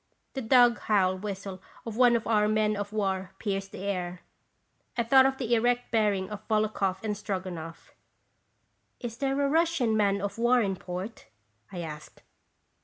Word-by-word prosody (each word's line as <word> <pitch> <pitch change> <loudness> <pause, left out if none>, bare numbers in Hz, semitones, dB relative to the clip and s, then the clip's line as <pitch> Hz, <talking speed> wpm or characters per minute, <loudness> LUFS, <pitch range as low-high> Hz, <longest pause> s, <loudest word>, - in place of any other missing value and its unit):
The 270 - -3
dog 240 0 +5
howl 190 -3 +2
whistle 195 -1 -6 0.2
of 225 -2 -5
one 245 0 +5
of 230 - -1
our 210 -2 +3
men 215 0 +2
of 205 0 -4
war 190 -3 -2
pierced 195 -2 -3
the 190 - -8
air. 180 -3 -3 0.8
I 235 - +2
thought 265 +3 +6
of 265 0 -2
the 240 -3 -1
erect 245 +1 +1
bearing 205 -4 +2
of 210 0 -8
Volokhoff 215 -3 0
and 210 -1 -1
Stroganoff. 185 -5 -6 0.6
" - - -46 0.3
Is 235 -1 -6
there 275 +1 0
a 280 - +2
Russian 315 -7 +2
man 200 -2 +2
of 200 +3 -4
war 240 +1 +4
in 195 -4 0
port?" 185 +4 -7 0.4
I 180 - -5
asked. 155 -2 -9
210 Hz, 170 wpm, -28 LUFS, 190-235 Hz, 0.8 s, thought